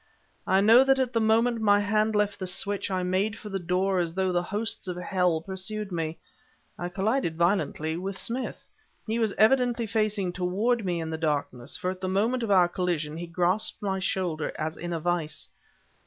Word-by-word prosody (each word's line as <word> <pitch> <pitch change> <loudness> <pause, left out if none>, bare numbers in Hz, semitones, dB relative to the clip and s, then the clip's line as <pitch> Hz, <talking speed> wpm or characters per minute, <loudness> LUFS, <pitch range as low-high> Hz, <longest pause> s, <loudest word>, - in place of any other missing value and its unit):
I 190 +1 +4
know 225 +5 +7
that 270 0 +4
at 260 -2 0
the 230 - +2
moment 225 +1 +2
my 205 -1 +5
hand 215 +1 +1
left 205 -1 +1
the 185 - -4
switch, 200 +2 -1
I 185 -1 -1
made 190 +4 0
for 210 - -9
the 195 -1 -2
door 185 +2 0
as 170 -1 -2
though 190 -1 +1
the 175 -1 +1
hosts 210 +3 -3
of 180 -1 -4
hell 180 -2 +1
pursued 195 +3 -3
me. 165 -2 -3 0.6
I 175 - -4
collided 195 -1 0
violently 170 -3 +1
with 190 +2 -4
Smith. 250 +2 -4 0.4
He 225 +1 -1
was 220 -3 0
evidently 240 +1 +3
facing 210 -3 0
toward 205 +7 0
me 175 -3 -1
in 160 -1 -4
the 160 - -4
darkness, 145 -6 -2
for 180 - -2
at 185 0 -9
the 185 - -2
moment 225 +7 +1
of 230 - -2
our 185 -3 +5
collision, 175 -4 -2
he 170 +1 -6
grasped 180 +5 0
my 190 -1 -1
shoulder 180 -4 -1
as 155 +1 -3
in 175 0 -6
a 165 - -1
vise. 160 -2 -2
190 Hz, 200 wpm, -27 LUFS, 175-215 Hz, 0.6 s, know